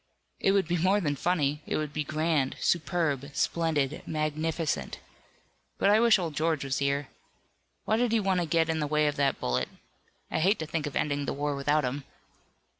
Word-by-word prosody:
"It 195 - +3
would 195 -4 +2
be 175 0 0
more 190 +4 +3
than 145 -7 -1
funny. 150 -2 0
It - - 0
would 150 -1 -3
be 150 - -1
grand, 155 -2 0
superb, 150 -4 0
splendid, 155 -4 0
magnificent. 155 - -2 0.8
But 200 - +3
I 215 - +5
wish 230 -2 +6
old 170 -4 -3
George 155 -1 0
was 135 -1 -1
here. 140 0 0 0.8
Why 220 - +2
did 240 -1 +1
he 230 - +3
want 190 -3 +1
to 175 - -1
get 165 0 +2
in 160 -1 0
the 150 - -1
way 150 +1 +2
of 145 -1 +1
that 140 -1 +1
bullet? 60 0 -1 0.6
I - - 0
hate 190 +6 +3
to 160 - -4
think 155 -1 -2
of 145 - -7
ending 145 -1 0
the - - -2
war 145 +1 -2
without 145 +2 +1
him." 135 +3 -3
155 Hz, 195 wpm, -28 LUFS, 145-170 Hz, 0.8 s, wish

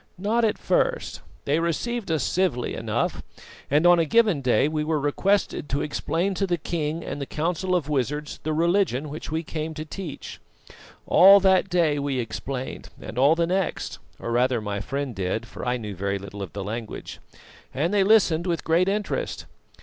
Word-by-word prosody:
"Not 215 +6 +1
at 215 -2 +2
first. - - 0 0.2
They 145 +3 +2
received 200 +7 -2
us 160 -5 +1
civilly 170 -10 0
enough; - - -2 0.5
and 150 +4 +3
on 175 0 +7
a 165 - +3
given 210 -4 +3
day 125 +1 +3
we 155 0 -1
were 155 0 0
requested 150 +3 0
to 140 - 0
explain 170 +5 -1
to 195 +1 -1
the 175 -1 +1
king 160 0 -3
and 145 - -5
the 140 - -4
Council 180 +4 -1
of 165 -6 0
Wizards 150 +1 -2
the 155 - -2
religion 165 -3 +1
which 150 +2 -7
we 160 +1 -1
came 155 0 -5
to 155 0 -5
teach. 165 -2 -7 0.7
All 195 +2 +8
that 190 0 +4
day 165 -5 +2
we 140 -2 -1
explained 125 +2 -5
and 120 - -6
all 140 +5 +5
the 170 0 +1
next 185 +1 -2 0.2
or 115 - -5
rather 125 +1 +2
my 105 -1 -3
friend 140 +4 -3
did, 95 +3 -2
for - - -9
I 125 0 0
knew 105 -4 -6
very 100 +2 -1
little 100 +1 -8
of 95 - -6
the 100 0 -4
language 110 +2 -6 0.5
and 160 +8 -1
they 200 -2 +4
listened 190 -5 +4
with 170 -2 -1
great 170 +3 +2
interest. 210 - -2
155 Hz, 185 wpm, -25 LUFS, 130-180 Hz, 0.7 s, All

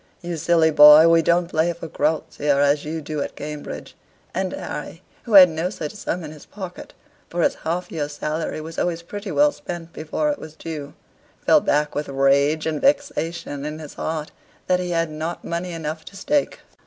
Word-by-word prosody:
"You 175 -1 -4
silly 160 0 +3
boy, 150 +2 +9
we 165 0 +5
don't 170 +2 +2
play 165 0 +1
for 165 0 -8
groats 160 0 -1
here 145 -1 +2
as 145 +1 +2
you 160 +1 -4
do 150 0 -4
at - - -5
Cambridge." 150 0 -7 0.4
And - - -1
Harry, - - -6 0.2
who 230 - -4
had 190 -2 +11
no 165 +2 -2
such 155 -6 -6
sum 175 0 -4
in 155 - -7
his 155 -2 -13
pocket 190 -3 -9 0.3
(for 175 0 -1
his - - +3
half 175 +3 -3
year's 150 -3 -3
salary 155 +1 -3
was 160 +1 -7
always 170 -1 -1
pretty 205 +3 -7
well 295 0 +4
spent 170 - -8
before 160 - -1
it 290 - -4
was 155 0 -10
due), 150 -3 -7 0.5
fell - - +6
back 150 +1 +1
with 145 0 -3
rage 140 +3 +2
and 160 -2 -2
vexation 275 - 0
in 150 +1 -4
his 155 -2 -9
heart 155 -1 -4 0.3
that 180 0 +2
he 180 -1 -3
had 165 -2 0
not 160 +3 -5
money 170 +1 -3
enough 160 -1 -5
to 195 - -12
stake. 290 +8 0
160 Hz, 195 wpm, -22 LUFS, 150-175 Hz, 0.5 s, had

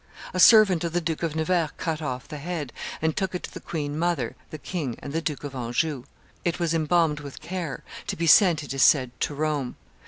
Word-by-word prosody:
A 185 - -2
servant 195 -4 +7
of 170 -1 -2
the 175 - +2
Duke 165 -2 -3
of 165 -2 -2
Nevers 160 0 +1
cut 160 -2 -2
off 130 -5 -4
the 150 - -7
head, 155 -4 -4 0.3
and 160 -1 +1
took 190 -1 -2
it 180 - -4
to - - -7
the - - -7
queen 150 -2 -4
mother, 165 -9 0
the 155 - -7
king, 150 -6 -4
and 140 - -8
the 165 - 0
Duke 150 -3 -3
of 145 -2 -6
Anjou. 125 +2 -2 0.4
It 170 0 -1
was 170 -2 0
embalmed 160 -1 +2
with 140 -2 -9
care, 170 -7 -5 0.2
to - - -2
be 170 - -1
sent, 165 -2 +6
it 140 - -5
is 135 - -1
said, 130 -4 +5
to 145 - -1
Rome. 150 -4 -1
155 Hz, 225 wpm, -25 LUFS, 145-170 Hz, 0.4 s, servant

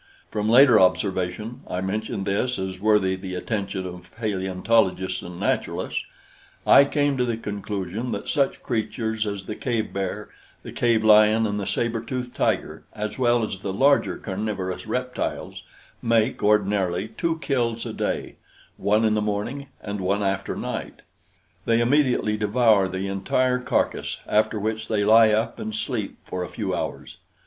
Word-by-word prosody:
From 105 0 -1
later 125 0 +7
observation 95 +4 0
I 90 - -3
mention 100 +1 -3
this 105 +6 0
as 95 -1 -4
worthy 105 -2 +3
the 95 -1 -6
attention 100 -1 -3
of 90 0 -9
paleontologists 95 -2 0
and 90 0 -9
naturalists - - -1 0.6
I 140 - +8
came 145 -1 +1
to 125 - +2
the 120 -2 -1
conclusion 105 +1 -4
that - - -4
such 140 -3 0
creatures 110 -1 -2
as 100 -2 -4
the 105 - -4
cave 115 -4 -2
bear, 100 +2 -3 0.3
the - - -8
cave 115 -2 +2
lion 110 +1 +6
and 105 -1 -1
the 100 - -4
saber 115 +3 -1
tooth 125 0 -5
tiger, - - -1
as 105 +3 -5
well 120 -2 +3
as 100 -3 -4
the 100 - -3
larger 140 +8 +3
carnivorous 95 -1 -4
reptiles 125 +3 -3 0.4
make, 115 +1 +1
ordinarily, 100 -2 +1
two 165 +9 -2
kills 120 -7 -1
a - - -5
day - - -3 0.4
one 105 +2 +2
in 110 - +3
the 105 - +1
morning 105 +7 -3 0.2
and 100 -1 -4
one 100 +2 0
after 95 -1 -1
night. - - -5 0.6
They 115 0 +3
immediately 125 -4 +2
devour 105 -2 +3
the 95 +1 -3
entire 125 +6 +1
carcass, 125 - -1
after 110 0 +1
which 110 +1 -2
they 105 -2 +1
lie 110 +1 +7
up 110 +2 0
and 220 -1 -4
sleep 125 - -3
for 90 - -4
a 90 - -6
few - - -3
hours. - - -5
105 Hz, 155 wpm, -24 LUFS, 95-115 Hz, 0.6 s, I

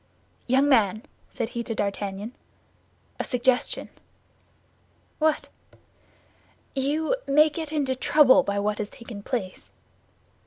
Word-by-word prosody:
"Young 265 +3 +3
man," 215 -5 +3 0.3
said 230 -1 -3
he 235 - -4
to 230 -1 -4
D'Artagnan, 200 +1 -3 0.9
"a - - 0
suggestion." 250 0 0 1.3
"What?" 310 -1 +1 1.3
"You 295 - 0
may 300 +2 +5
get 315 0 -5
into 280 -4 0
trouble 280 0 +5
by 200 -5 -2
what 210 +1 -1
has 210 -1 -3
taken 230 -3 -10
place." 200 -4 -5
250 Hz, 110 wpm, -25 LUFS, 210-285 Hz, 1.3 s, may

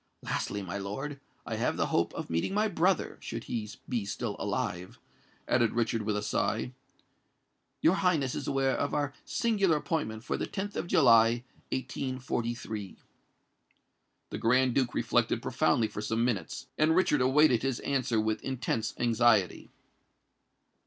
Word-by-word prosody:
Lastly, 100 -1 -2
my 95 +2 -4
lord, 135 +9 -5 0.3
I - - -3
have - - 0
the - - +2
hope - - +2
of - - -4
meeting 85 - -1
my 215 +1 +3
brother—should 180 - -1
he 110 -3 -4 0.2
be 120 -5 -1
still 105 +2 -3
alive," 100 -4 -3 0.5
added 120 -2 +2
Richard, 115 -1 0
with 105 0 -1
a 105 - -3
sigh. 110 +4 -1 1.1
"Your 165 - +6
Highness 170 -9 +1
is - - -4
aware 135 -1 +1
of 145 - -1
our 145 -2 -1
singular 200 -8 +2
appointment 130 - -3
for - - -2
the - - -3
10th 200 +1 -4
of - - -3
July, 115 -5 +5 0.3
1843." 120 -6 -3 1.3
The - - -3
Grand 125 +3 +3
Duke 130 -2 +1
reflected - - +1
profoundly 115 - +1
for 105 - -6
some 115 +2 0
minutes; 105 -9 -2
and 155 +1 +4
Richard 160 -6 +3
awaited 130 -1 +4
his 135 -2 -1
answer 130 -5 0
with 110 0 0
intense 125 -4 -2
anxiety. 115 -5 +2
120 Hz, 145 wpm, -30 LUFS, 110-145 Hz, 1.3 s, Your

